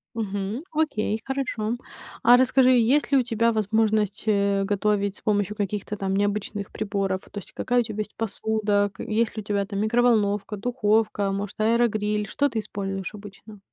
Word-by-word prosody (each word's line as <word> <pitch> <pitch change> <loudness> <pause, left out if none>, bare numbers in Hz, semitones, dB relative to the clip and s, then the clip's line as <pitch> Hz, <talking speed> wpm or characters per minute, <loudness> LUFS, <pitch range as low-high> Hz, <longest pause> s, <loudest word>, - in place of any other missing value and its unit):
Мгм, 205 +4 -3
окей, 250 -9 0
хорошо. 250 -4 -2 0.5
А 245 +1 +8
расскажи, 260 0 +4
есть 255 +5 +3
ли 275 - +5
у 255 - +3
тебя 230 0 +1
возможность, 215 -1 +1
э, 200 -1 +2
готовить 205 0 0
с - - -14
помощью 205 -1 0
каких-то 210 0 -3
там 195 -1 -1
необычных 205 0 -2
приборов? 195 -3 -2
То 205 - -5
есть - - -13
какая 245 0 +1
у - - +3
тебя 215 -1 -6
есть 210 0 -4
посуда, 210 -2 0
к - - -10
есть 225 +1 0
ли 215 - -3
у - - -12
тебя 200 -1 -1
там 200 -1 -4
микроволновка, 215 -2 +2
духовка, 215 -2 +1
может, 200 +1 -4
аэрогриль, 215 -2 +1
что 285 +6 +1
ты 225 - -2
используешь 195 -1 -4
обычно? 205 +1 -12
210 Hz, 170 wpm, -25 LUFS, 200-225 Hz, 0.5 s, А